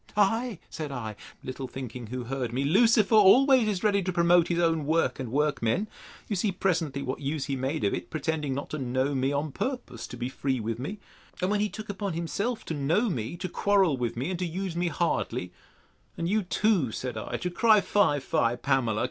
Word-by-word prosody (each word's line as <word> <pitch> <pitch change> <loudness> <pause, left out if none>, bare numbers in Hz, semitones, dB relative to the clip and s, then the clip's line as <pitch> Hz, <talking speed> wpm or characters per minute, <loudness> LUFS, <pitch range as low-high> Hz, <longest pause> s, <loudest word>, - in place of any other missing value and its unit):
Ay, 225 +2 +2
said 155 -3 -5
I, 110 -5 -5 0.3
little 130 +1 -5
thinking 125 -2 -7
who 125 +2 -4
heard 125 -1 -3
me, 130 +3 -1
Lucifer 215 +7 +4
always 245 +4 +6
is 200 -2 -1
ready 200 -2 +3
to 185 0 -2
promote 175 -1 +4
his 170 - 0
own 165 -3 +1
work 165 -1 +1
and 125 -4 -4
workmen. 145 - +1 0.4
You 210 - -1
see 200 +2 +1
presently 165 -7 -1
what 130 - -3
use 140 0 -2
he 140 0 -2
made 135 +1 -2
of 100 - +2
it, 90 - -4
pretending 155 -3 -2
not 140 - -5
to 155 - -3
know 130 +2 0
me, 135 0 +1
on 145 +1 -1
purpose 200 - -4
to 125 - -9
be 120 +1 -2
free 130 0 -2
with 115 +1 -3
me. 170 +12 -4 0.4
And 185 +2 0
when 210 - +1
he 210 +1 +1
took 215 +1 -8
upon 200 -2 -3
himself 200 +8 -2
to - - -3
know 165 - +1
me, 120 +3 -4
to 185 +1 -3
quarrel 190 -3 +2
with 120 -2 -3
me, 135 +9 -2
and 180 -1 -4
use 180 +1 -3
me 175 +1 0
hardly: 135 - -1 0.7
And 170 - -2
you 215 +4 +2
too, 185 - +1
said 125 +1 -4
I, 110 - -4
to 180 - -3
cry, 220 +3 +5
Fie, 200 -8 +2
fie, 120 -3 +1
Pamela! 125 -5 0
160 Hz, 210 wpm, -27 LUFS, 130-195 Hz, 0.7 s, always